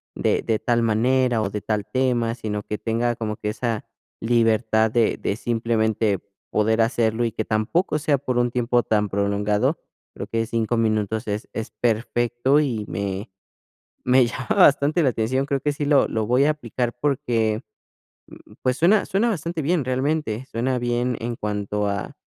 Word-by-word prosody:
de - - 0
de 110 -1 0
tal 120 -1 +1
manera 120 +2 +2
o 95 - -1
de 105 0 -4
tal 105 -2 -2
tema, 120 -3 +1
sino 105 -3 -4
que 105 - -4
tenga 120 +1 0
como 110 -2 -4
que 105 - -3
esa 115 0 -3 0.4
libertad 110 -1 +2
de 115 -1 +2
de 100 - -2
simplemente 110 -3 0 0.3
poder 110 +1 +2
hacerlo, 115 0 +1
y 115 - -1
que 110 - -3
tampoco 125 - 0
sea 145 -1 +2
por 130 -2 -2
un 120 0 +2
tiempo 120 0 +1
tan 105 -2 +1
prolongado, 100 +1 0 0.4
creo - - -6
que 115 0 -1
5 115 0 -1
minutos 110 0 0
es 105 +1 -3
es 110 - -5
perfecto 120 +4 +1
y 115 -8 -1
me 100 +3 -4 0.8
me 125 0 +5
llama 125 +2 -5
bastante 155 -2 +5
la 140 - +4
atención. 130 +5 -1
Creo 140 -2 -1
que 145 +1 0
sí 145 +1 -3
lo 145 -1 +4
lo 110 -1 -1
voy 125 +4 +3
a - - +4
aplicar 120 -4 -2
porque, 120 -5 0 0.8
mm, - - -17
pues 130 0 +1
suena 195 +7 +4
suena 205 +4 +1
bastante 170 -4 -3
bien 155 -2 +1
realmente, 130 -2 -1
suena 125 +2 -1
bien 120 0 -1
en 120 0 -3
cuanto 105 0 -2
a 100 -1 -3
115 Hz, 170 wpm, -23 LUFS, 110-130 Hz, 0.8 s, me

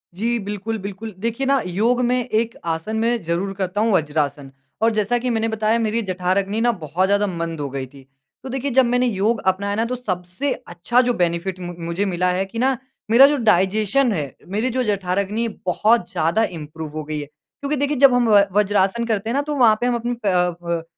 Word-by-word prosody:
जी। 235 +5 0
बिल्कुल, 210 +2 -4
बिल्कुल 200 +3 -7
देखिए 230 +5 -2
ना 275 0 +3
योग 225 +7 +1
में 250 +1 +1
एक 230 0 0
आसन 165 +6 -2
मैं 230 +1 +1
ज़रूर 175 +4 -2
करता 195 +1 -2
हूँ 225 +1 +2
वज्रासन 145 -4 -1 0.3
और 225 +1 +4
जैसा 215 +3 +1
कि 250 +1 -2
मैंने 225 -1 0
बताया 220 +1 +1
मेरी 225 0 0
जठराग्नि 190 +2 -1
ना 240 +1 +3
बहुत 175 -2 -1
ज़्यादा 205 +1 +2
मंद 170 -3 -4
हो 145 -1 -3
गई 135 0 -4
थी। 135 0 -17 0.4
तो 265 - -7
देखिए 270 +2 -2
जब 260 +1 +5
मैंने 245 +1 +2
योग 220 +1 0
अपनाया 200 +2 +1
ना 225 +2 0
तो 250 +2 -2
सबसे 185 +3 -3
अच्छा 175 +8 +1
जो 245 -1 +1
बेनिफ़िट 175 0 -1
मु 175 -1 -6
मुझे 170 +4 -1
मिला 180 -1 0
है 185 +2 0
कि 230 +4 -7
ना 260 +1 +2 0.3
मेरा 250 +4 +9
जो 290 +1 +1
डाइज़ेशन 215 +6 +3
है 145 -7 -4
मेरी 215 +7 -1
जो 255 +1 0
जठराग्नि 200 +2 -1 0.2
बहुत 210 +2 +2
ज़्यादा 165 +8 +1
इंप्रूव 160 -4 -6
हो 155 - -3
गई 150 0 -4
है। 145 - -5
क्योंकि 280 - -6
देखिए 285 +1 0
जब 270 0 +6
हम 245 -2 +3
व 205 -2 +7
वज्रासन 205 +2 +2
करते 220 -1 -1
हैं - - -1
ना 280 - +2
तो 295 0 -3
वहाँ 235 -5 +5
पे 245 - +1
हम 245 - +1
अपने 240 +1 -2
प 180 -3 +2
प 170 -1 -2
205 Hz, 215 wpm, -21 LUFS, 180-235 Hz, 0.4 s, मेरा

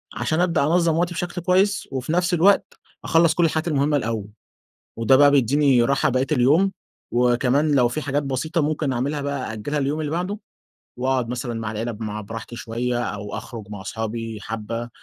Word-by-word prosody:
عشان 160 +1 -1
أبدأ 170 -5 +2
أنظّم 165 +1 +2
وقتي 175 +1 0
بشكل 175 +1 -4
كويس، 195 +3 +2
وفي 135 +3 -3
نفس 180 +1 +1
الوقت 190 +4 +3 0.3
أخلّص 165 -1 +4
كل 170 0 +2
الحاجات 160 +1 0
المهمة 145 -1 +2
الأول، 110 -5 -3 0.7
وده 115 +3 +4
بقى 145 +1 +6
بيديني 135 -1 +3
راحة 135 +2 +2
بقيّة 130 +1 +1
اليوم، 155 +9 +3 0.4
وكمان 125 +5 +2
لو 125 -3 +4
في 155 - -3
حاجات 145 +1 -1
بسيطة 140 +5 -1
ممكن 150 -2 0
اعملها 140 +4 -2
بقى 140 -4 -3
أأجلها 125 +7 -3
لليوم 145 +3 -1
اللي 150 -1 -3
بعده، 185 +5 -2 0.6
وأقعد 130 -2 0
مثلًا 120 -1 -4
مع 110 -1 -3
العيلة 115 +2 -3
مع 105 -1 -4
براحتي 115 +3 -8
شوية، 120 +2 -2
أو 105 -2 -5
أخرُج 110 -5 -8
مع 105 -2 -7
أصحابي 115 +2 -4
حبّة 115 +2 -5
135 Hz, 175 wpm, -23 LUFS, 115-155 Hz, 0.7 s, بقى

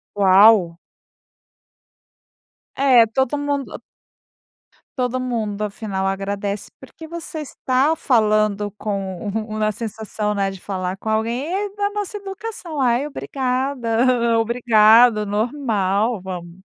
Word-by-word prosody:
Uau. 195 -3 +5 2.0
É 255 -4 +5
todo 265 +5 0
mundo 285 -1 -3 1.2
todo 250 0 -1
mundo, 220 -5 -3
afinal, 200 -2 -3
agradece, 200 +1 -3
porque 320 - -12
você 330 -1 -7
está 275 +1 0
falando 215 -6 +1
com 195 -3 -4 0.3
uma 215 -1 -1
sensação, 215 -1 -4
né, 195 -1 0
de 190 - -10
falar 185 -1 -4
com 205 - -11
alguém, 230 +7 -1
e - - -3
aí 405 0 -3
da 405 0 0
nossa 415 0 -4
educação, 390 -6 -6
"ai, 245 +3 +2
obrigada, 250 -4 0
obrigado", 225 -1 +5
normal, 215 -2 0
vamos 180 -1 -8
225 Hz, 110 wpm, -21 LUFS, 205-265 Hz, 2.0 s, Uau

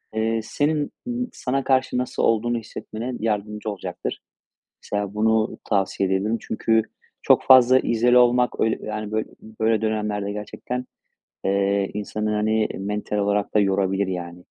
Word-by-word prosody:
eee, 115 +1 +1
senin 145 +4 0
n 245 0 -2
sana 135 +1 -2
karşı 130 -1 +1
nasıl 125 0 -2
olduğunu 120 +1 +2
hissetmene 115 +2 -6
yardımcı 105 0 -2
olucaktır. 100 -2 -5 0.6
Mesela 100 -1 -3
bunu 110 +1 +1
tavsiye 95 -1 0
edebilirim. 100 +4 +1
Çünkü 110 0 +1 0.4
çok - - +4
fazla 130 0 +7
izole 120 +2 +3
olmak, 125 0 +3
öyle, 110 - +1
yani, 105 -1 -4
bö 110 0 0 0.4
böyle 110 -1 +2
dönemlerde 105 -2 -1
gerçekten, 120 +4 -5 0.6
eee, 100 0 +1
insanı, 105 +1 -3
hani, 110 +1 +1
mental 105 +1 -3
olarak 100 +1 0
da - - +5
yorabilir 95 0 +1
yani. 90 -1 -6
110 Hz, 135 wpm, -23 LUFS, 100-120 Hz, 0.6 s, fazla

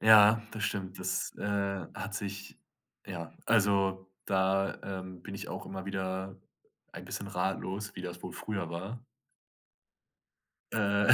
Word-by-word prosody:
Ja, 110 0 +9
das 110 - -3
stimmt, 95 -1 -1
das, 90 0 +1
äh, - - -4 0.5
hat 105 -1 -4
sich 100 -1 -3 0.5
ja, 85 -3 -5
also, 100 -3 +4 0.2
da, 95 0 +3 0.2
ähm, 95 -1 -9
bin - - -6
ich - - -5
auch - - -4
immer 95 0 -5
wieder 95 0 -2 0.6
ein - - -7
bisschen 100 - -3
ratlos, 95 +2 -1
wie 90 - -4
das 90 -1 -5
wohl 90 - -5
früher 100 -6 -3
war. 100 +8 -5 1.7
Äh, 100 -1 +3
95 Hz, 135 wpm, -32 LUFS, 95-100 Hz, 1.7 s, Ja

